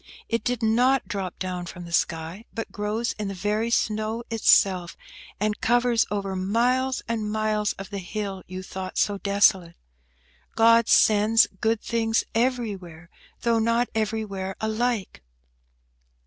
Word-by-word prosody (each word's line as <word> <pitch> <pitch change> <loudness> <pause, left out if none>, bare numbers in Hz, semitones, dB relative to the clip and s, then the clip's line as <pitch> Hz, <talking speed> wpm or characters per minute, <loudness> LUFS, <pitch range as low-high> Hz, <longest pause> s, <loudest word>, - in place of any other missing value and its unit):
It 230 0 -1
did 245 -2 -2
not 250 +4 +3
drop 195 -5 -4
down 180 -2 -4
from 175 +1 -8
the 170 - -10
sky, 170 +5 -1
but 225 - -5
grows 210 +3 -2
in 210 - -2
the 195 - -5
very 210 +4 -1
snow 215 0 -1
itself, 190 -5 +3 0.4
and 210 0 -1
covers 240 -1 +2
over 195 -1 -3
miles 245 +7 +1
and 220 -2 -2
miles 215 -1 0
of 195 +2 -10
the 200 - -4
hill 195 0 -5
you 185 +1 -7
thought 185 0 -7
so 205 -1 +1
desolate. 195 -4 +2 0.8
God 230 0 +5
sends 215 +2 +5
good 225 0 +1
things 225 -1 0
everywhere, 205 -9 -2 0.3
though 230 -1 +2
not 230 +2 +1
everywhere 210 -3 -2
alike." 220 - -2
215 Hz, 135 wpm, -25 LUFS, 195-230 Hz, 0.8 s, God